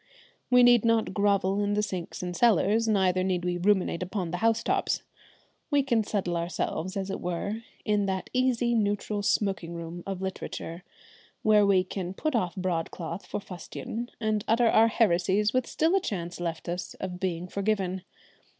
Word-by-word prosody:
We 250 0 +6
need 245 -2 +6
not 230 -4 +2
grovel 200 -1 +2
in 205 0 0
the 210 - +1
sinks 185 -3 -5
and 180 -1 -4
cellars, 220 +1 +3
neither 185 -3 +2
need 180 -2 -1
we 175 0 -1
ruminate 190 -2 +2
upon 180 -2 -3
the 180 - -2
house 230 +2 +2
tops. - - 0 0.7
We 290 -2 +3
can 235 -5 +2
settle 190 -4 -1
ourselves 175 +2 -3
as 195 0 -3
it - - -4
were, 190 +5 -3 0.2
in 210 -2 +1
that 190 -1 -3
easy, 250 -2 +2
neutral 205 -1 0
smoking 195 -4 0
room 170 +1 -6
of 195 -2 -3
literature, 185 -2 -5 0.6
where 210 -1 +5
we 190 -2 +4
can 185 0 -5
put 310 +6 -1
off 180 -7 0
broadcloth 175 0 -3
for - - -3
fustian; 205 +5 -6
and 215 -2 0
utter 230 +1 +4
our 225 +1 +6
heresies 205 -1 +2
with 255 -1 +1
still 325 +3 +1
a 390 - +3
chance 175 - -4
left 165 -2 -4
us 180 +1 -4
of 180 -2 -6
being 180 -2 -2
forgiven. 195 -1 -1
195 Hz, 170 wpm, -28 LUFS, 180-220 Hz, 0.7 s, We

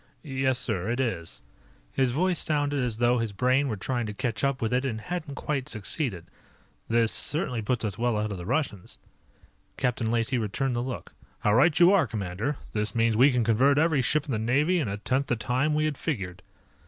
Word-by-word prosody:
"Yes, 135 -3 0
sir, 110 -7 -2
it 120 +2 -1
is." 95 - -3 0.5
His 130 -2 +2
voice 180 +6 +1
sounded 145 -2 0
as 120 -3 -1
though 120 +1 +3
his 115 -2 -2
brain 130 +6 +2
were 110 -5 -2
trying 120 +3 -2
to 105 - -6
catch 115 -4 -3
up 140 -1 +1
with 115 +1 -1
it 125 +1 +2
and 115 -5 -2
hadn't 155 +2 -5
quite 140 -3 -3
succeeded. 105 - -1 0.6
"This 115 -1 +3
certainly 145 -7 -2
puts 115 +1 -1
us 105 +1 -3
well 120 -2 +1
ahead 105 0 -1
of 95 - -5
the 85 - -7
Russians." 125 - -2 0.8
Captain 120 -3 0
Lacey 120 +2 +1
returned 120 +5 -1
the 120 - 0
look. 130 +1 -6 0.3
"How 105 - +3
right 150 +8 +4
you 175 +1 +7
are, 190 -9 +4
commander. 105 +6 -3 0.2
This 105 +1 -1
means 115 -1 +2
we 130 +6 +6
can 125 -2 +1
convert 125 +6 +3
every 155 -2 +3
ship 150 +4 +1
in 140 - -5
the 110 - 0
Navy 145 +11 +2
in 150 - -1
a 100 0 -3
tenth 130 +6 -1
the 120 - +1
time 125 +7 0
we 155 0 +2
had 150 -3 -2
figured." 95 - -3
125 Hz, 210 wpm, -27 LUFS, 110-140 Hz, 0.8 s, you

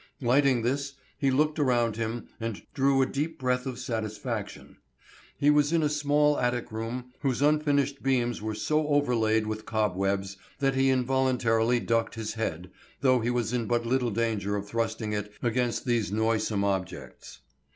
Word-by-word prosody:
Lighting 130 -1 +3
this, 140 +3 -1 0.3
he 135 - +2
looked 150 +4 +1
around 120 -5 +2
him 115 +1 -3
and 115 -3 -4
drew 135 -1 +3
a - - +2
deep 150 +5 -3
breath 125 0 -1
of 130 -2 -4
satisfaction. 110 -4 -5 0.6
He 145 +1 +4
was 150 0 +3
in 165 -2 +2
a 150 - +2
small 150 0 +2
attic 120 -1 -1
room 120 +3 -5
whose 135 -1 0
unfinished 145 -2 +2
beams 120 -4 0
were 110 0 -3
so 155 +6 0
overlaid 115 -7 +2
with 110 0 -5
cobwebs 100 -2 -1 0.2
that 135 -1 +1
he 135 0 +3
involuntarily 125 -3 +2
ducked 115 0 0
his 110 -1 -4
head, 90 -5 -4 0.3
though 130 -2 +4
he 115 +1 -1
was 120 -1 -1
in 120 -3 -1
but 120 0 0
little 125 0 +1
danger 105 -2 -1
of 100 0 -4
thrusting 110 -1 -2
it 105 0 -4
against 120 +1 0
these 120 -5 0
noisome 110 -1 0
objects. 95 -2 -4
120 Hz, 160 wpm, -28 LUFS, 110-135 Hz, 0.6 s, He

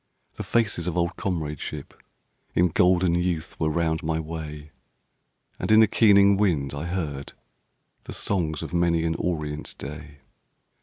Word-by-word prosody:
The - - -7
faces 105 -7 0
of 90 - -2
old 85 +1 0
comradeship 80 -6 -4 0.6
In 90 0 +4
golden 90 +1 +3
youth 85 -2 -1
were 80 - +1
round 80 0 0
my 80 0 -1
way. 75 -2 -7 0.9
And - - -3
in 110 - +8
the 110 - +8
keening 100 -2 +5
wind 80 -10 +1
I 70 +3 -4
heard 80 -6 -4 0.7
The - - -7
songs 80 -6 -2
of - - -7
many 85 -1 +2
an 80 - +1
orient 75 -4 -3
day. 75 0 -9
85 Hz, 145 wpm, -25 LUFS, 75-90 Hz, 0.9 s, in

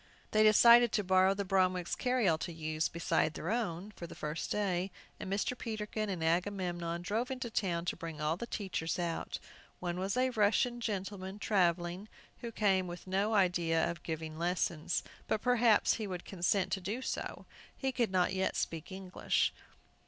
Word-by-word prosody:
They 215 - +4
decided 235 +2 +7
to 210 - +2
borrow 190 +1 +4
the 200 0 -2
Bromwicks' 185 -2 +1
carryall 245 -11 +2
to 175 - -4
use, 155 -1 -2
beside 165 -2 0
their 170 - -3
own, 205 -4 -2
for 170 -4 -8
the - - -10
first 150 +2 -4
day, 190 -3 0 0.3
and 190 - -5
Mr. 205 +5 0
Peterkin 215 -2 -3
and 180 -4 -3
Agamemnon 175 -1 -1
drove 225 +6 -1
into 255 -3 -4
town 175 -6 -1
to - - -1
bring 165 -2 -7
all 150 +1 +1
the 235 +7 -6
teachers 190 -7 -2
out. 170 -2 -2 0.4
One 175 0 -3
was 195 +4 -1
a 255 0 +2
Russian 225 +2 +2
gentleman, 195 -2 -4
travelling, 180 -1 +1 0.3
who 235 - -5
came 195 -4 +2
with 175 0 -8
no 200 +4 +1
idea 175 -4 +2
of 170 -1 -9
giving 160 -1 -5
lessons, 170 -2 0 0.2
but - - +1
perhaps 235 -2 +4
he 215 -2 -3
would 180 -2 -5
consent 185 +1 0
to 195 - -1
do 215 +8 -3
so. - - -4 0.3
He 265 -1 -1
could 240 -3 +1
not 185 0 +2
yet 190 0 0
speak 165 +2 -3
English. 190 -1 0
190 Hz, 175 wpm, -33 LUFS, 170-215 Hz, 0.4 s, decided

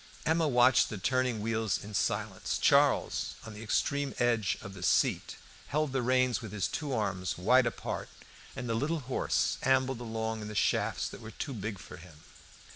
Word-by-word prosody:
Emma 160 0 +2
watched 125 -1 +5
the 110 - -5
turning 125 +2 0
wheels 110 -1 0
in 105 +1 -9
silence. 95 - -1
Charles, - - +3
on 110 - -8
the 105 - -9
extreme 140 +5 0
edge 115 -5 +1
of 100 - -9
the 95 - -10
seat, 95 +1 +1 0.3
held 150 -2 -1
the 135 - +1
reins 130 0 +2
with 110 -4 -7
his 105 -4 -1
two 150 -3 -4
arms 100 -6 -1
wide 120 +7 +4
apart, - - -4 0.5
and 125 -2 -5
the 115 - 0
little 150 +7 -1
horse 130 0 0
ambled 130 -2 +2
along 110 -1 -3
in 105 - -6
the 105 - -7
shafts - - +1
that - - -9
were 110 - -8
too 135 - -5
big 105 -2 -4
for - - -11
him. 80 -3 -15
115 Hz, 185 wpm, -30 LUFS, 105-130 Hz, 0.5 s, watched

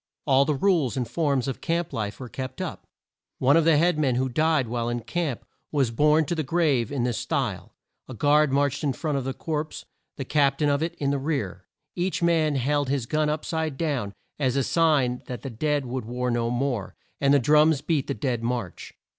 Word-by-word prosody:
All 135 -1 +4
the 150 - 0
rules 155 - +1
and 125 -2 -1
forms 140 -4 0
of 135 - -4
camp 170 0 -1
life 105 -2 -3
were 130 - -6
kept 130 +2 -6
up. - - -5 0.5
One 135 +2 +4
of 165 -1 +4
the 165 -2 +5
head 170 0 +2
men 135 -5 +2
who 130 +1 0
died 155 0 +2
while 120 0 -2
in 120 0 -2
camp, 160 -3 -3 0.3
was 135 -6 +1
borne 150 +6 +3
to 160 - -2
the 160 - -1
grave 145 -6 +1
in 135 -4 -1
this 120 -2 -1
style: - - -3 0.3
A 130 - -8
guard 150 +3 +3
marched 140 +1 +1
in 140 -3 +1
front 150 0 -2
of 130 - -6
the 135 - -2
corpse, 155 -1 -4 0.3
the 135 - -4
cap 140 -1 +2
tain 150 -1 +1
of 140 0 +1
it 165 +1 -2
in 140 -1 -1
the 140 - 0
rear. 130 - -3 0.3
Each 175 0 -1
man 160 -3 +2
held 145 +1 0
his 135 -4 0
gun 155 +3 0
up 155 0 -2
side 160 -4 -2
down, 135 -11 -2 0.2
as 130 -3 +1
a 140 - +2
sign 140 -6 +2
that 125 - -6
the 135 - -5
dead 145 +4 -1
would 125 -1 -4
war 125 +2 -2
no 120 0 0
more, 120 -4 -2 0.2
and 140 0 +3
the 145 - +6
drums 150 +2 +4
beat 150 -4 0
the 140 - -2
dead 125 -5 -2
march. 115 -6 -4
140 Hz, 220 wpm, -25 LUFS, 125-155 Hz, 0.5 s, the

